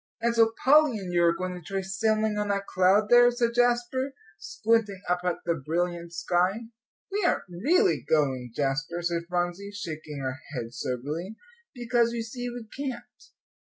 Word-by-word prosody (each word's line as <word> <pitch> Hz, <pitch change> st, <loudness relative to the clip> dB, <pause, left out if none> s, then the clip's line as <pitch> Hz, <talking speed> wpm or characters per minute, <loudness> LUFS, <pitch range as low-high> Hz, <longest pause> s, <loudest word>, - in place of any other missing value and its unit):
"And 235 Hz, 0 st, +1 dB
so 225 Hz, -1 st, +4 dB
Polly 290 Hz, -3 st, +6 dB
and 185 Hz, -3 st, -6 dB
you 175 Hz, 0 st, +3 dB
are 170 Hz, -, +5 dB
going 185 Hz, +1 st, -3 dB
to 180 Hz, -, -8 dB
try 195 Hz, +3 st, -3 dB
sailing 215 Hz, +3 st, 0 dB
on 210 Hz, -, -1 dB
that 200 Hz, -1 st, -1 dB
cloud 195 Hz, +3 st, +3 dB
there," 245 Hz, 0 st, +8 dB
said 240 Hz, -1 st, 0 dB
Jasper, 245 Hz, +2 st, +1 dB, 0.2 s
squinting 210 Hz, +5 st, 0 dB
up 180 Hz, 0 st, +1 dB
at 180 Hz, -2 st, -2 dB
the 170 Hz, -, +2 dB
brilliant 170 Hz, +3 st, -2 dB
sky. 180 Hz, +5 st, 0 dB, 0.5 s
"We 410 Hz, +1 st, -1 dB
aren't 350 Hz, -, +2 dB
really 310 Hz, -, +2 dB
going, 130 Hz, -5 st, +1 dB
Jasper," 145 Hz, +5 st, -1 dB
said 170 Hz, -1 st, -1 dB
Phronsie, 175 Hz, +2 st, -2 dB
shaking 155 Hz, -6 st, -6 dB
her 130 Hz, +1 st, -3 dB, 0.2 s
head, 120 Hz, -1 st, -5 dB
soberly, 150 Hz, -, -4 dB, 0.4 s
"because 240 Hz, -1 st, +1 dB
you 230 Hz, -1 st, -2 dB
see 245 Hz, +2 st, -5 dB
we 240 Hz, -1 st, -7 dB
can't. 265 Hz, -3 st, -6 dB
195 Hz, 165 wpm, -27 LUFS, 170-235 Hz, 0.5 s, there